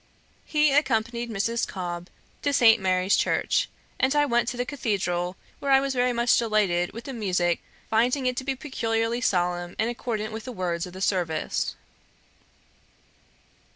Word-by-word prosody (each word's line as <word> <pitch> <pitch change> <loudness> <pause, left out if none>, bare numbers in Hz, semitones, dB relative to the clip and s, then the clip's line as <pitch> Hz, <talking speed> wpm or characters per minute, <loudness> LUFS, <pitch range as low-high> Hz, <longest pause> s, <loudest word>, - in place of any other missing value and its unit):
He 300 -1 +3
accompanied 235 -4 +1
Mrs. 230 +2 -1
Cobb 175 -1 -5 0.3
to 285 - +1
St. 230 -5 +6
Mary's 185 +1 +2
church, - - +1 0.3
and 265 +2 +2
I 295 0 +4
went 240 -3 +1
to 245 - -3
the 245 - -1
cathedral, 190 -9 -2 0.2
where 280 - -3
I 270 - +7
was 275 0 -1
very 250 0 +2
much 235 0 +3
delighted 205 -6 +1
with 230 - -8
the 270 - -6
musick, 180 -6 0 0.3
finding 250 +5 +2
it 250 0 +1
to 260 - -2
be 270 0 -1
peculiarly 230 -4 -1
solemn 175 -4 0
and 225 +2 +1
accordant 220 -3 -3
with 220 0 -6
the 255 - -5
words 180 -5 -2
of 180 - -11
the 190 - -8
service. 175 -5 -1
225 Hz, 160 wpm, -26 LUFS, 185-250 Hz, 0.3 s, I